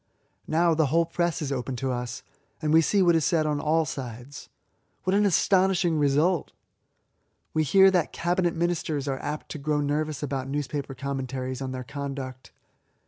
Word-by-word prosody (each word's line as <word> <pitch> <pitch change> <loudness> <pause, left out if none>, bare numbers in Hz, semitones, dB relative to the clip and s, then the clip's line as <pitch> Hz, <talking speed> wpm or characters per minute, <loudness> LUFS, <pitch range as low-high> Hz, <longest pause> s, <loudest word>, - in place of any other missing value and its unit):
Now 165 +1 +3
the 160 -2 +2
whole 165 +4 +2
press 170 -3 -1
is 140 - -3
open 130 -1 -3
to 130 +2 -2
us, 125 -1 -4 0.4
and 155 -1 0
we 160 - +7
see 195 +4 +2
what 170 -2 +4
is 160 - +2
said 160 -1 +2
on 150 -1 0
all 160 +2 +2
sides. 130 0 -7 0.5
What 185 - 0
an 205 +1 +4
astonishing 185 -3 +3
result! 150 +5 +2 1.0
We 155 - +2
hear 190 +6 +6
that 180 -4 +1
Cabinet 175 0 0
Ministers 165 -4 -1
are 135 -1 -2
apt 150 +1 -5
to 155 - -5
grow 150 +1 0
nervous 150 +1 -1
about 135 -2 -3
newspaper 140 -1 -3
commentaries 130 -1 -4
on 130 -1 -3
their 130 0 -5
conduct. 135 -1 -6
150 Hz, 170 wpm, -26 LUFS, 135-170 Hz, 1.0 s, we